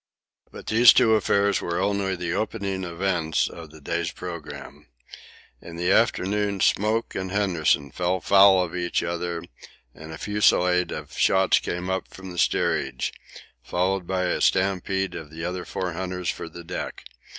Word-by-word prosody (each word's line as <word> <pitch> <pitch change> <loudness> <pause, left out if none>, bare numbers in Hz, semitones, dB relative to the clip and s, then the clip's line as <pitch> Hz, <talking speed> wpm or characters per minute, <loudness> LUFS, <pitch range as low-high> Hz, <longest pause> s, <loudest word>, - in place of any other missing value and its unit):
But - - -11
these 115 +1 +7
two 110 - +4
affairs 100 -2 +2
were 85 0 -2
only 100 -1 0
the 85 -1 -3
opening 100 -3 -2
events 85 -2 0
of 80 -2 -10
the 80 +1 -14
day's 85 +3 -2
programme. 85 -4 -9 0.7
In 85 - -10
the 90 +2 0
afternoon 105 -2 +1
Smoke 110 +5 +1
and 95 0 -4
Henderson 85 -8 +1
fell 90 +3 -1
foul 95 0 +6
of 90 -1 -6
each 90 -1 -1
other, 85 -1 -3 0.5
and 80 +1 -11
a 80 - -7
fusillade 90 -3 +2
of - - -7
shots 95 0 +3
came 90 +1 -4
up 95 0 -2
from 95 -1 -10
the 90 - -5
steerage, 65 - 0 0.5
followed 90 0 -1
by 95 -1 -1
a 90 - -1
stampede 95 0 +1
of 80 -2 -8
the 80 +2 -7
other 90 0 -4
four 90 -2 -4
hunters 90 0 -3
for 85 - -8
the 85 +1 -10
deck. 80 - -6
90 Hz, 160 wpm, -24 LUFS, 85-95 Hz, 0.7 s, these